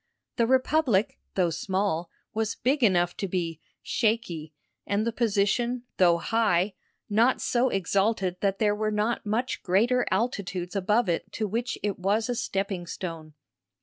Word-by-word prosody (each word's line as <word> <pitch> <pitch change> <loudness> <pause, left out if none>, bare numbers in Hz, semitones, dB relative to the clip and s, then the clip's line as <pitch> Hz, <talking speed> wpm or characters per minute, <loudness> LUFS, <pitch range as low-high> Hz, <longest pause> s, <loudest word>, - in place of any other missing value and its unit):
The 230 - +3
republic, 260 -4 +2 0.2
though 180 -3 +2
small, 185 -1 -1 0.2
was 220 0 -1
big 275 +3 0
enough 175 -5 +3
to 195 - -2
be 170 -3 -2 0.2
"shaky," 210 -9 -1 0.4
and 205 +2 +1
the 235 - 0
position, 235 +2 +1
though 175 -2 +5
high, 205 -1 +1 0.3
not 230 +5 +3
so 250 +1 +1
exalted 195 -1 0
that 195 -1 0
there 210 -1 +2
were 215 +1 -1
not 215 +1 -1
much 235 +5 -1
greater 235 +7 +2
altitudes 190 -4 -2
above 210 +4 +2
it 170 -1 -1
to 215 - -1
which 235 +5 -2
it 205 -3 -1
was 210 +5 +1
a - - +1
stepping 195 -5 -2
stone. 165 -4 -6
205 Hz, 150 wpm, -27 LUFS, 185-230 Hz, 0.4 s, though